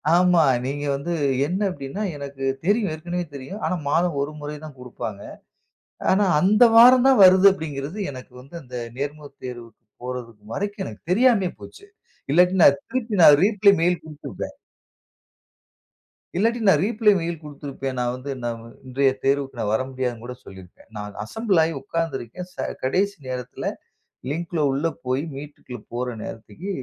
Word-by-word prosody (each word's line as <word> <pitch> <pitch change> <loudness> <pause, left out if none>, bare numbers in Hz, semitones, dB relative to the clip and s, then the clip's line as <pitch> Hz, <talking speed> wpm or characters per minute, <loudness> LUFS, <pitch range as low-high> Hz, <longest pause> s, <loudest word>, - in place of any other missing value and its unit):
ஆமா. 180 -2 +5 0.2
நீங்க 145 +2 -3
வந்து 170 +5 -3 0.3
என்ன 185 +5 -2
அப்படின்னா 145 +8 -5
எனக்கு 140 -1 -7 0.2
தெரியும் 205 -3 +2
ஏற்கனவே 175 +3 -4
தெரியும். 185 +11 -8
ஆனா, - - 0
மாதம் 170 -1 +1
ஒரு 145 +2 -2
முறை 150 +1 -5
தான் 145 -4 -11
குடுப்பாங்க. 110 -5 -7 0.9
ஆனா, 200 +2 +3
அந்த 210 +8 +5
வாரம் 250 +2 +8
தான் 265 -5 +5
வருது 185 +1 +8
அப்படின்னு 160 +3 -4
எனக்கு 130 -1 -11
வந்து 140 +6 -14
அந்த 125 -2 -11 0.2
நேர்முக 145 +1 -4 0.2
தேர்வுக்கு 120 -2 -9 0.2
போவது 125 -2 -5 0.2
வரைக்கும் 205 0 -3
எனக்கு 105 - -9
தெரியாமலே 220 -4 +4
போச்சு. 405 - -12 0.5
இல்லாட்டி 180 +4 +4
நான் 140 0 +6
திருப்பி 240 -4 -3
நான் 145 -2 +9
ரிப்ளை 205 -1 +5
மெயில் 175 +1 +2
குடுத்துருப்பேன். 145 -8 -8 1.8
இல்லாட்டி 230 +4 +1
நான் 160 -5 +5
ரிப்ளை 215 -1 +3
மெயில் 165 -1 -4
குடுத்திருப்பேன். 140 -3 -6
நான் 120 0 0
வந்து 135 +2 -6
நா 120 - -2 0.4
இன்றைய 135 +1 +2
தேர்வுக்கு 135 -3 0
வர 110 - +2
முடியாதுன்னு 125 -3 -3
கூட 125 - -6
சொல்லியிருப்பேன். 95 -2 -14
நான் 105 0 -6
அசெம்பிள் 195 - 0
ஆகி 165 +1 -1
உட்கார்ந்து 165 0 -2
இருக்கேன். 175 +11 -8
ச - - -28 0.3
கடைசி 200 +9 +1
நேரத்தில 125 -1 -6 0.7
லிங்க்ல 165 +2 -3
உள்ள 145 +5 0 0.2
போய் 130 +3 0
மீட்குள்ள 140 -4 -9
போகிற 125 +1 -2
நேரத்துக்கு 115 - -8
150 Hz, 150 wpm, -23 LUFS, 130-185 Hz, 1.8 s, நான்